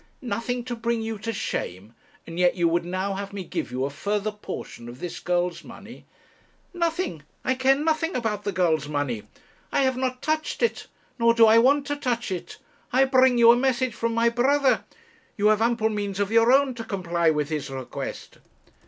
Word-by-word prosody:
'Nothing 245 0 -3
to 245 0 -4
bring 230 0 -1
you 220 -1 -4
to 230 +2 -3
shame, 100 - -4 0.3
and 165 +1 -7
yet 180 -1 +4
you 175 -2 +2
would 170 +1 +1
now 185 +2 -2
have 200 +1 -6
me 200 -2 -4
give 160 - -4
you 130 +1 -1
a 140 - -3
further 205 +7 -2
portion 205 - -8
of 120 +2 -11
this 175 - -5
girl's 175 0 -1
money!' - - -12 0.7
'Nothing! 335 - -1 0.2
I 260 - +2
care 260 +1 +3
nothing 315 +3 0
about 220 -4 -2
the 205 - -1
girl's 165 -5 +1
money. 145 -7 -3 0.4
I - - +2
have 260 -1 +1
not 255 0 -2
touched 310 +6 -1
it, 470 - 0 0.3
nor 230 0 +4
do 230 -1 +7
I 225 +1 +7
want 275 +4 +4
to 290 - -2
touch 245 -7 -2
it. 180 -2 -5 0.3
I 265 +2 +4
bring 260 -2 +4
you 235 0 +8
a - - +5
message 255 -1 +1
from 230 0 -2
my 230 0 +3
brother; 265 +3 +2 0.5
you 210 +1 +4
have 215 0 +3
ample 230 -1 +2
means 205 -2 -3
of 200 +1 0
your 230 +1 +5
own 270 0 +4
to 235 -1 -6
comply 175 -6 0
with 150 -1 0
his 150 -3 -3
request.' 130 -2 -7
225 Hz, 195 wpm, -25 LUFS, 180-255 Hz, 0.7 s, you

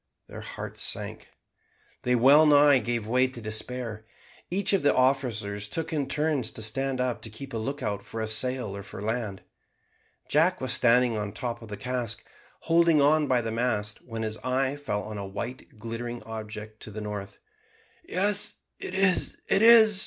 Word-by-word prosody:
Their - - -9
hearts - - -7
sank. - - -3 0.7
They 125 0 +2
wellnigh 145 +2 +6
gave 115 -1 -2
way 125 +3 +3
to 130 -2 -10
despair. 110 0 -4 0.4
Each 195 +2 0
of 195 - +3
the 145 - +3
officers 115 -6 0
took 160 +8 -3
it - - 0
in 140 -3 -1
turns 150 -5 0
to 110 - -5
stand 130 +4 -1
up 125 -1 -1
to 115 - -6
keep 135 +5 -9
a - - -2
lookout 125 -4 -3
for 115 - -8
a 110 - -2
sail 120 -1 -1
or 100 - -6
for 100 - -10
land. 110 -2 -3 0.8
Jack 165 +5 +3
was 130 -1 -1
standing 120 -1 +3
on 105 0 -2
the 100 - -9
top 120 -1 -4
of 115 - -10
the 105 -1 -7
cask, 125 0 -3 0.4
holding 165 -1 +4
on 150 +1 +4
by 125 -2 +2
the 115 -1 -3
mast, 110 -3 -2
when 115 -2 -6
his 110 0 -2
eye 130 +2 0
fell 105 -9 -3
on 105 0 -6
a 100 - -5
white 110 +4 -7
glittering 115 +2 -6
object 110 -1 -8
to - - -8
the 105 +1 -7
northward. 105 -2 -6 0.7
"Yes, 205 - +1 0.2
it 185 - -5
is! 190 -2 +2
it 195 - +4
is!" 220 -3 +9
125 Hz, 180 wpm, -27 LUFS, 110-145 Hz, 0.8 s, is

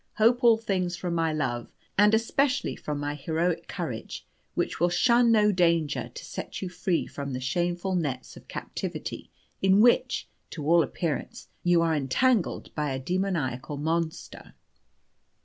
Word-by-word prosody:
Hope 235 +3 +3
all 230 -2 +7
things 185 -5 -1
from 175 -1 -3
my 165 -1 +1
love, 130 -6 -2 0.2
and, 210 +2 +5
especially, 275 +5 +1
from 150 -1 -4
my 145 0 -2
heroic 160 +4 -1
courage, - - -5 0.3
which - - -1
will 175 +2 +3
shun 235 +6 +4
no 210 -2 +5
danger 170 -5 +1
to - - -8
set - - -6
you 190 - -4
free 180 -1 -1
from 140 -1 -6
the 125 - -2
shameful 175 +7 -1
nets 145 -8 -2
of - - -14
captivity - - -5 0.3
in 190 +1 +5
which, 240 +2 +3 0.2
to 150 -4 -6
all 170 +2 +5
appearance, 150 -1 -3
you 175 -1 +4
are 165 -1 +2
entangled 170 - +1
by 150 -2 -1
a 130 - -2
demoniacal 150 -5 -2
monster." 160 +2 -3
170 Hz, 150 wpm, -27 LUFS, 150-195 Hz, 0.3 s, all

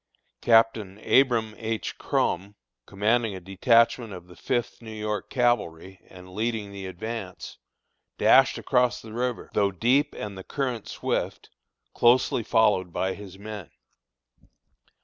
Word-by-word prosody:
Captain 115 -4 +3
Abram 120 -5 +3
H. 110 -1 -4
Krom, 100 +4 -1 0.3
commanding 110 +1 +1
a - - -6
detachment 115 +4 +2
of 90 -2 -9
the 90 0 -15
Fifth 120 -2 -2
New 110 -1 -9
York 105 -2 -4
Cavalry, 95 -8 -1
and 90 0 -13
leading 110 -1 -2
the 100 -1 -7
advance, 95 +1 -7 0.6
dashed - - +5
across 125 0 +1
the 110 -1 -11
river, 125 0 -3
though 100 -1 +2
deep 125 - +1
and 105 -1 -6
the 95 - -8
current 125 -4 -3
swift, - - -3 0.4
closely 120 0 +3
followed 105 -5 +2
by 95 +2 -1
his 95 -2 -11
men. 105 -3 -8
110 Hz, 130 wpm, -26 LUFS, 95-120 Hz, 0.6 s, dashed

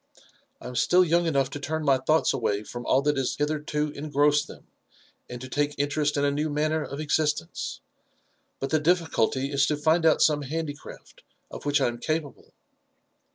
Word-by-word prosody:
"I - - -9
am 125 - -7
still 180 +7 +4
young 170 +1 +2
enough 140 -4 +1
to 145 - -5
turn 155 +2 -3
my 135 -2 +4
thoughts 155 +5 +2
away 105 +1 -1
from 120 +2 -8
all 135 +1 +3
that 150 -1 +1
has 135 -1 -1
hitherto 150 0 -1
engrossed 145 0 +1
them, - - -13 0.6
and 125 - -7
to 130 - -7
take 145 +2 -1
interest 145 +1 0
in 140 - +2
a 140 - +2
new 150 +2 -1
manner 155 +1 0
of 140 0 -7
existence; 150 - -1 0.8
but 135 - -4
the 155 - +3
difficulty 150 -5 +1
IS 140 -1 +2
to 150 - 0
find 160 +3 +2
out 160 -2 +4
some 150 -2 +3
handicraft 145 +1 -7 0.3
of - - -8
which 145 +1 +3
I 135 - +2
am 120 0 -4
capable." 155 -1 -4
145 Hz, 185 wpm, -26 LUFS, 140-155 Hz, 0.8 s, still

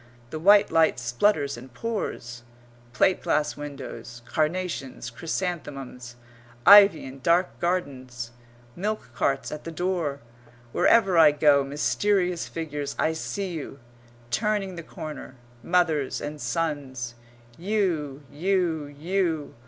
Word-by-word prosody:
The 155 - -4
white 200 +4 +6
light 160 -5 +4
splutters 140 - +1
and 130 +2 -11
pours. 120 - -4 0.5
Plate 180 +9 +2
glass 150 0 0
windows. 140 -4 -8
Carnations; 155 -3 -2
chrysanthemums. 135 -6 -5 0.5
Ivy 200 -6 +8
in 135 +1 -9
dark 170 +7 +1
gardens. 130 -9 -3 0.4
Milk 210 +4 -3
carts 135 0 0
at 150 - -6
the 165 - -6
door. 170 -5 -2 0.5
Wherever 195 - +4
I 155 -2 +8
go, 145 -1 +4
mysterious 180 +5 0
figures, 150 -3 -5
I 160 - +1
see 190 +4 -4
you, 155 -4 -6 0.5
turning 195 - 0
the 170 - -6
corner, 155 -4 -8 0.3
mothers 160 -4 +1
and 150 0 -6
sons; 140 -7 -3 0.4
you, 170 - -1
you, 165 -1 0
you. 160 +1 -2
155 Hz, 115 wpm, -26 LUFS, 140-180 Hz, 0.5 s, Ivy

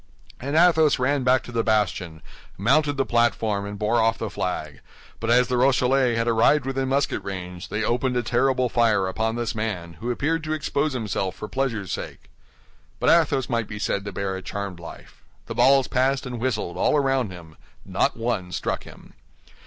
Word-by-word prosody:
And 140 +4 -3
Athos 160 -3 +5
ran 135 +1 +1
back 130 +1 +3
to - - -10
the 115 -1 0
bastion, 95 -7 -1 0.3
mounted 145 +9 +2
the 135 - +1
platform, 110 -4 +1
and 100 0 -6
bore 110 +3 +1
off 115 0 +2
the 110 - -4
flag; 75 -5 -4 0.4
but 115 - -3
as 125 +1 +4
the 125 -1 0
Rochellais 130 -1 +3
had 115 0 0
arrived 120 +5 +3
within 135 0 -2
musket 140 +1 0
range, 90 -2 -6
they 105 +1 -2
opened 125 +2 0
a 120 - 0
terrible 130 +1 +1
fire 110 -5 +2
upon 110 +4 -1
this 120 -2 -2
man, 105 -7 -4
who 120 - -4
appeared 155 +6 -1
to 155 - -1
expose 150 -1 -1
himself 105 -6 -2
for 105 - -7
pleasure's 115 -8 -2
sake. - - -7 0.7
But - - +3
Athos 155 -6 +3
might 115 -3 -1
be 105 - -7
said 100 -1 -1
to 100 - -4
bear 95 0 -3
a 95 - -6
charmed 100 -2 -5
life. 85 - -12 0.2
The - - -5
balls 135 0 +4
passed 135 +2 +1
and 125 -2 -5
whistled 110 -8 -2
all 150 - +2
around 135 -5 +1
him; 85 -3 -12 0.3
not - - 0
one 115 -6 -2
struck - - -3
him. - - -14
120 Hz, 190 wpm, -24 LUFS, 100-135 Hz, 0.7 s, Athos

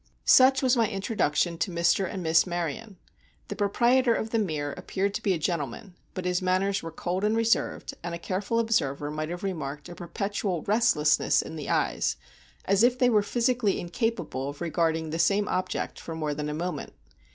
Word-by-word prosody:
Such 265 +1 +6
was 255 0 +4
my 230 -3 +2
introduction 185 -5 0
to - - 0
Mr. 170 +2 +1
and 190 -3 -5
Miss 160 +2 +4
Maryon. 175 +4 -4 0.5
The - - -4
proprietor 235 +4 +3
of 220 - -3
The 230 - +1
Mere 150 -8 -2
appeared 200 +1 -2
to - - -3
be 200 - +1
a - - -1
gentleman, 165 +1 -3 0.2
but 185 -2 -4
his 180 0 0
manners 190 +2 +1
were 165 - -6
cold 180 +4 -3
and 215 +2 +2
reserved, 230 0 0
and 170 0 -3
a - - -4
careful 195 +6 -2
observer 150 -11 0
might 155 +1 -3
have 175 +2 -6
remarked 150 -6 -4
a - - -7
perpetual 185 0 -3
restlessness 205 -9 +3
in - - -8
the 150 -3 -6
eyes, - - +1 0.5
as 195 +1 +3
if 245 +1 +4
they 250 -1 +3
were 210 -2 +4
physically 235 -1 +1
incapable 175 - -2
of 145 - -9
regarding 160 -1 0
the 165 - -3
same 200 +5 +2
object 185 - -2
for 165 - -7
more 155 -2 -2
than 150 +1 -4
a - - -3
moment. 175 +3 -4
185 Hz, 190 wpm, -27 LUFS, 160-215 Hz, 0.5 s, Such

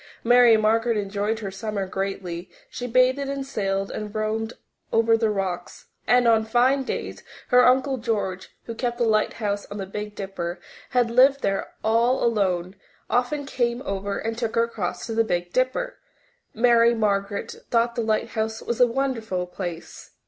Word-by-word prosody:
Mary 240 -1 +6
Margaret 225 +1 +2
enjoyed 205 +2 -2
her 195 -2 -4
summer 200 0 -3
greatly; 190 -2 -4 0.2
she 245 - -5
bathed 255 +2 +3
and 275 -1 -3
sailed 195 -6 -2
and 210 0 -6
roamed 220 +1 -2 0.4
over 225 0 +4
the 225 -1 +1
rocks, 190 -4 -4 0.2
and 245 +1 +4
on 225 -1 +4
fine 245 +5 +3
days 260 - -4 0.3
her 250 -1 +6
Uncle 265 +1 +3
George, 200 -6 -2
who 230 - -6
kept 240 +1 -2
the 240 - +1
lighthouse 215 -2 0
on 205 - -7
the 195 - -4
Big 210 +2 -6
Dipper, 185 -3 -5 0.3
and 245 -2 +2
lived 270 +2 +5
there 195 -1 -1
all 230 +4 +2
alone, 190 -5 0 0.4
often 275 +4 0
came 245 -1 -1
over 200 -3 -3
and 225 +1 -3
took 230 -2 -2
her 230 - +4
across 220 -6 -4
to 225 - -4
the 225 0 +3
Big 175 -4 -2
Dipper. - - -1 0.5
Mary 235 0 +4
Margaret 200 -2 -1
thought 235 0 +2
the 235 - -2
lighthouse 220 0 -1
was 235 +1 -3
a 245 - +7
wonderful 230 -7 -2
place. 180 -2 -7
225 Hz, 165 wpm, -24 LUFS, 200-245 Hz, 0.5 s, a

